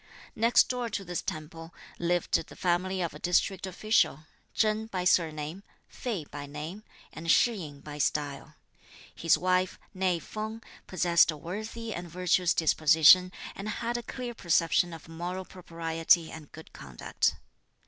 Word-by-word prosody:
Next 230 +2 +4
door 245 -2 -2
to 195 -2 -4
this 175 0 -3
temple 165 +2 -7 0.2
lived 175 0 0
the - - -13
family 185 +1 0
of 170 - -3
a 150 - -10
district 180 +2 +1
official, 190 -5 +1 0.3
Chen 215 0 +1
by 185 -5 -3
surname, 160 -1 +1 0.3
Fei 210 -11 -4
by 145 0 -8
name, 155 +8 -7 0.3
and 165 +1 -7
Shih 240 +7 +5
yin 150 -9 -8
by 150 -1 -8
style. 145 -1 -2 0.6
His 165 -2 +3
wife, 185 +1 +1 0.2
née 185 -2 +1
Feng, 220 +4 -6 0.2
possessed 175 -2 +4
a 155 - -2
worthy 215 +7 -6
and 175 0 -6
virtuous 180 +1 +1
disposition, 160 +3 +6 0.2
and 200 +2 -5
had 235 +2 -3
a 240 - -1
clear 245 0 -6
perception 175 -3 +2
of 165 -1 -10
moral 175 +3 -5
propriety 165 -2 0
and 155 -2 -10
good 160 - -13
conduct. 65 -4 -2
175 Hz, 150 wpm, -29 LUFS, 160-195 Hz, 0.6 s, disposition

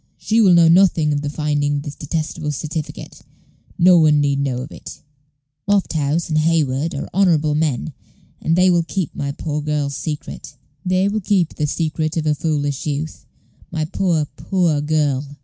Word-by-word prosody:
She 225 +1 +1
will 185 -5 +6
know 170 -1 +6
nothing 165 -3 +4
of 145 - -1
the 145 - -3
finding 145 -1 -1
of 140 - -3
this 145 - -6
detestable 155 +1 -3
certificate. 155 +2 -6 0.6
No 180 0 +6
one 150 -2 +4
need 140 -1 +1
know 135 -3 -1
of 135 - -10
it. - - -11 0.7
Lofthouse 165 -5 +1
and 155 -1 +1
Hayward 155 -1 0
are - - -4
honorable 165 -6 +3
men, 150 -2 -1 0.5
and 160 - +1
they 180 +1 +4
will 175 -1 +3
keep 175 0 -3
my 140 0 -3
poor 150 +1 -4
girl's 145 -2 -2
secret; 150 -2 -6 0.3
they 185 +1 +1
will 210 +1 -1
keep 185 -4 +1
the 150 - -1
secret 155 +1 -2
of 160 - -1
her 150 - +2
foolish 145 -2 -2
youth 150 +2 -4 0.4
my 160 -2 -2
poor, 165 -2 0
poor 175 -6 0
girl!" 145 -2 -1
155 Hz, 170 wpm, -20 LUFS, 145-170 Hz, 0.7 s, will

